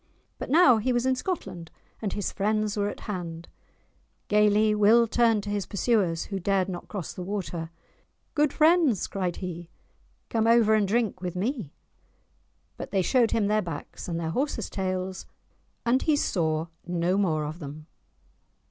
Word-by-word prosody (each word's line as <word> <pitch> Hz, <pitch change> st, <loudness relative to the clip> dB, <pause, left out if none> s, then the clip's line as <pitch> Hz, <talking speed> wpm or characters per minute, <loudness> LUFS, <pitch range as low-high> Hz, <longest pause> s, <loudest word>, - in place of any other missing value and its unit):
But -, -, -5 dB
now 275 Hz, -5 st, +6 dB
he 225 Hz, +4 st, 0 dB
was 240 Hz, 0 st, +1 dB
in 260 Hz, -, +3 dB
Scotland, 255 Hz, -, -4 dB, 0.3 s
and 205 Hz, -3 st, -2 dB
his 205 Hz, -, -2 dB
friends 215 Hz, +1 st, 0 dB
were 205 Hz, -1 st, 0 dB
at -, -, -8 dB
hand; 170 Hz, -5 st, -5 dB, 0.8 s
gaily 210 Hz, +1 st, +4 dB
Will 215 Hz, +3 st, +5 dB
turned 225 Hz, -2 st, +2 dB
to 205 Hz, -, -4 dB
his 205 Hz, -2 st, -2 dB
pursuers, 200 Hz, -6 st, +1 dB
who 195 Hz, -2 st, -4 dB
dared 190 Hz, 0 st, +1 dB
not 180 Hz, -2 st, -6 dB
cross 195 Hz, -6 st, -5 dB
the -, -, -7 dB
water; 180 Hz, -4 st, -4 dB, 0.6 s
"Good 295 Hz, -1 st, +2 dB
friends," 315 Hz, -, +3 dB
cried 185 Hz, -3 st, -2 dB
he, 175 Hz, -2 st, -6 dB, 0.6 s
"come 225 Hz, -1 st, +1 dB
over 230 Hz, -2 st, +5 dB
and 210 Hz, -2 st, +3 dB
drink 215 Hz, -3 st, 0 dB
with 180 Hz, -1 st, -4 dB
me!" 210 Hz, -, -2 dB, 1.1 s
But -, -, -6 dB
they 195 Hz, -2 st, +1 dB
showed 240 Hz, +2 st, +3 dB
him 220 Hz, -3 st, +1 dB
their 215 Hz, +1 st, +2 dB
backs, 165 Hz, -6 st, -7 dB
and 170 Hz, -1 st, -2 dB
their 160 Hz, -1 st, -2 dB
horses's 255 Hz, -, -2 dB
tails, 185 Hz, -1 st, -3 dB, 0.6 s
and 245 Hz, +3 st, +3 dB
he 310 Hz, -, +2 dB
saw 160 Hz, -, 0 dB, 0.2 s
no 175 Hz, +1 st, 0 dB
more 165 Hz, -6 st, +1 dB
of 155 Hz, +3 st, -6 dB
them. 150 Hz, 0 st, -8 dB
205 Hz, 165 wpm, -27 LUFS, 180-230 Hz, 1.1 s, now